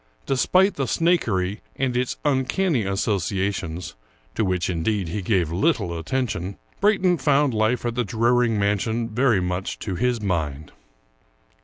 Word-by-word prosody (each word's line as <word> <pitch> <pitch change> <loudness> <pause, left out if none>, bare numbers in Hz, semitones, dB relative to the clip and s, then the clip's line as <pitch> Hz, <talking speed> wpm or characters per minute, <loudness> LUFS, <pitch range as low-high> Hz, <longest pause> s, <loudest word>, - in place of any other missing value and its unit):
Despite 185 +9 +3
the 135 -2 -1
Snakery 110 - +1 0.2
and 130 -2 -1
its 125 0 -1
uncanny 140 - +1
associa 100 0 0
tions 85 -1 -5 0.2
— - - -36
^to - - +1
which, 90 -3 0
indeed, 90 +1 -1
he 100 +4 -3
gave 90 -5 +1
little 100 - +1
attention 95 0 -3
— - - -34
Brayton 190 -4 +3
found 145 -2 +3
life 110 +3 +1
at 120 - -1
the 120 +1 0
Druring 115 +2 +2
mansion 105 +3 0
very 120 -2 +2
much 90 +1 -3
to 100 - -4
his 120 +4 0
mind. 80 -8 -2
110 Hz, 150 wpm, -23 LUFS, 90-125 Hz, 0.2 s, Despite